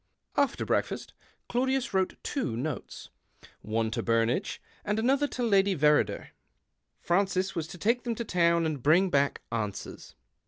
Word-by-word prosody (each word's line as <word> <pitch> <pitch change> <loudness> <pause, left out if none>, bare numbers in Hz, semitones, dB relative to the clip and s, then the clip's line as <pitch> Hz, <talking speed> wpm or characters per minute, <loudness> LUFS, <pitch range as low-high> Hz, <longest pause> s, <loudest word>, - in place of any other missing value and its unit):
After 280 -2 +1
breakfast - - -1 0.3
Claudius 260 0 0
wrote 190 -1 +1
two 130 - -2
notes 145 +3 -5 0.3
— - - -38 0.2
one 110 +1 -1
to - - -1
Burnage 115 - 0 0.2
and 210 +1 -1
the 240 +4 +3
other 290 +1 +1
to 250 - -4
Lady 200 -3 +3
Verrider. 150 +1 +2 0.7
Francis 190 +1 +1
was 165 -3 -3
to 180 - -9
take 235 +7 +1
them 235 -2 -2
to 235 - -4
town 170 -3 +2
and 155 -4 -2
l)ring 175 +5 +4
back 140 0 +1
answers. 105 - -5
180 Hz, 155 wpm, -29 LUFS, 145-230 Hz, 0.7 s, l)ring